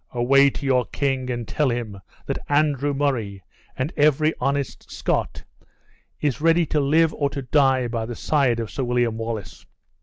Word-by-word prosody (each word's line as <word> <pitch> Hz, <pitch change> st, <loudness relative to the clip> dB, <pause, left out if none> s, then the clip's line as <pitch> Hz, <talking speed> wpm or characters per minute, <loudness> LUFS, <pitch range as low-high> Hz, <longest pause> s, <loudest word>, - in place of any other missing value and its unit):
Away 135 Hz, +3 st, +5 dB
to 140 Hz, -, -7 dB
your 125 Hz, -2 st, +2 dB
king 135 Hz, +1 st, -2 dB
and 120 Hz, -3 st, -3 dB
tell 150 Hz, +4 st, 0 dB
him 115 Hz, -5 st, -4 dB, 0.3 s
that -, -, -3 dB
Andrew 145 Hz, -1 st, +2 dB
Murray, 120 Hz, -9 st, -2 dB, 0.3 s
and 130 Hz, +5 st, -2 dB
every 155 Hz, +1 st, +3 dB
honest 140 Hz, -1 st, -2 dB
Scot, -, -, -2 dB, 0.8 s
is 145 Hz, -1 st, -1 dB
ready 165 Hz, +1 st, +4 dB
to 150 Hz, -, +3 dB
live 155 Hz, +3 st, +3 dB
or 140 Hz, -1 st, -1 dB
to 140 Hz, -1 st, -5 dB
die 130 Hz, -2 st, +2 dB
by 115 Hz, -1 st, -3 dB
the 120 Hz, -, -5 dB
side 130 Hz, -3 st, +1 dB
of 115 Hz, -2 st, -4 dB
Sir 135 Hz, -, -3 dB
William 120 Hz, -2 st, 0 dB
Wallace." 115 Hz, -3 st, -5 dB
135 Hz, 170 wpm, -23 LUFS, 120-145 Hz, 0.8 s, Away